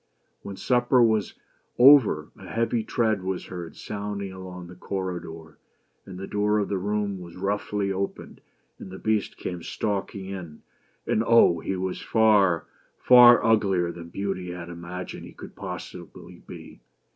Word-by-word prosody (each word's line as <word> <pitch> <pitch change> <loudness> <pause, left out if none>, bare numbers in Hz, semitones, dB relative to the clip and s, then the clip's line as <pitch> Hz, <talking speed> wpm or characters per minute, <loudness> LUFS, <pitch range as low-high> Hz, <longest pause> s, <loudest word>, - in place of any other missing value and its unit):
When 100 - -8
supper 125 +2 +3
was 110 -4 +1 0.4
over, 120 - +6
a - - -13
heavy 115 0 -1
tread 110 -4 0
was 95 0 -4
heard 85 -2 -8
sounding 100 -2 -5
along 90 -1 -9
the 90 - -11
corridor; 90 -4 -6 0.5
and 90 - -9
the 95 - -6
door 105 +1 0
of 105 - -1
the 100 - -1
room 100 0 -2
was 85 -1 -11
roughly 100 +1 -2
opened 95 +1 -5 0.4
and - - -9
the 95 - -9
Beast 110 0 -1
came 90 -1 -5
stalking 100 +1 -3
in. 90 -5 -8 0.4
And, 110 - +1
Oh! 115 -7 +5
he 95 - -3
was 95 0 -4
far 105 -7 +3 0.2
— - - -40
far 120 -1 +8
uglier 95 -6 +2
than 85 -1 -10
Beauty 95 -1 -4
had 85 -1 -7
imagined 85 +1 -7
he - - -12
could - - -12
possibly - - -9
be - - -11
95 Hz, 155 wpm, -25 LUFS, 90-105 Hz, 0.5 s, far